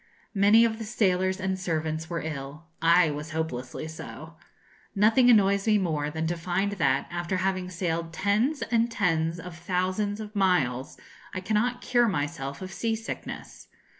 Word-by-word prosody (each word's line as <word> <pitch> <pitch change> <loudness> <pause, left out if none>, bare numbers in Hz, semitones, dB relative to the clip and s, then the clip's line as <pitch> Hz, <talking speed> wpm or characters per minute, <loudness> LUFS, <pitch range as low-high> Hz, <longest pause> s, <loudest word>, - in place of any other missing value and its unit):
Many 210 +3 +6
of 220 -1 -1
the - - -4
sailors 190 -4 +1
and 190 0 -2
servants 160 -2 -2
were 170 -1 -3
ill. 150 0 -6 0.2
I 170 -1 +5
was 150 +2 -6
hopelessly 155 -3 -4
so. 160 0 -9 0.6
Nothing 225 +5 +5
annoys 200 -2 +4
me 215 -1 +5
more 155 -6 -1
than 160 +1 -3
to 170 +2 -1
find 185 +4 -1
that, 140 -9 +1
after 175 +2 -2
having 185 -1 -1
sailed 170 -2 -2
tens 215 - +1
and 230 0 +3
tens 170 -7 0
of 175 0 -8
thousands 185 +4 -1
of 215 0 -8
miles, 145 -11 +1 0.4
I - - -1
cannot 220 +6 0
cure 240 -1 +3
myself 145 -4 -3
of 185 0 -7
sea 225 +5 -1
sickness. 225 +1 -7
185 Hz, 160 wpm, -27 LUFS, 160-205 Hz, 0.6 s, Many